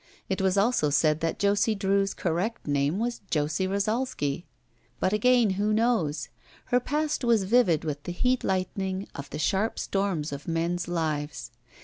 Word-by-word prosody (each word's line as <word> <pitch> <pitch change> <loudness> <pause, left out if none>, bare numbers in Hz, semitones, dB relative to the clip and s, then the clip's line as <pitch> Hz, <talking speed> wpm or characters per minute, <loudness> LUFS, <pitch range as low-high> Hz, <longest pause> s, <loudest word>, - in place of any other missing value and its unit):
It 190 0 -1
was 190 0 +2
also 200 -7 +3
said 150 +1 +3
that 165 0 -1
Josie 205 +2 +2
Drew's 195 0 +1
correct 185 +7 -2
name 145 +3 +1
was 235 +2 -2
Josie 155 +5 0
Rosalsky. 200 - -1 0.5
But 185 - +1
again 235 0 +4
who 205 +3 0
knows? 165 - +1 0.4
Her 250 -1 +2
past 300 +3 -1
was 230 -4 +3
vivid 190 -7 +3
with 145 -2 -3
the - - -3
heat 250 +8 +1
lightning 190 +1 -2
of 140 - -8
the - - -5
sharp 195 +8 0
storms 190 -7 -1
of 140 0 -7
men's 170 +1 -1
lives. 150 -7 -2
190 Hz, 155 wpm, -27 LUFS, 155-215 Hz, 0.5 s, again